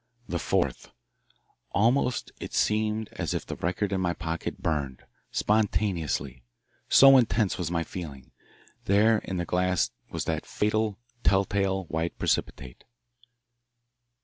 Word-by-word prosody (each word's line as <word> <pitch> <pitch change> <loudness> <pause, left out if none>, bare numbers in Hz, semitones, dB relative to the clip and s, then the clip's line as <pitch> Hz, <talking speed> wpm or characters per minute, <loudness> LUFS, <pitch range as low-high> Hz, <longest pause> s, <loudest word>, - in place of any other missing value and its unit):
The 85 - -2
fourth - - -1 0.8
Almost 125 +4 +2
it - - -6
seemed 110 0 +1
as - - -3
if - - -3
the - - -5
record 95 +4 -1
in 95 - 0
my 90 -1 +1
pocket 85 -1 -4
burned 70 -5 -2 0.3
spontaneously 90 - 0 0.5
so 135 0 +8
intense 115 -5 +2
was 85 -3 -2
my 85 -1 0
feeling. 75 -8 -8 0.5
There 105 +3 +4
in 95 - -5
the 85 - -1
glass 90 -4 +1 0.2
was - - -4
that - - -2
fatal, 105 -1 0 0.3
telltale 95 0 +2
white 80 0 -3
precipitate. 60 -2 -2
95 Hz, 120 wpm, -27 LUFS, 85-105 Hz, 0.8 s, so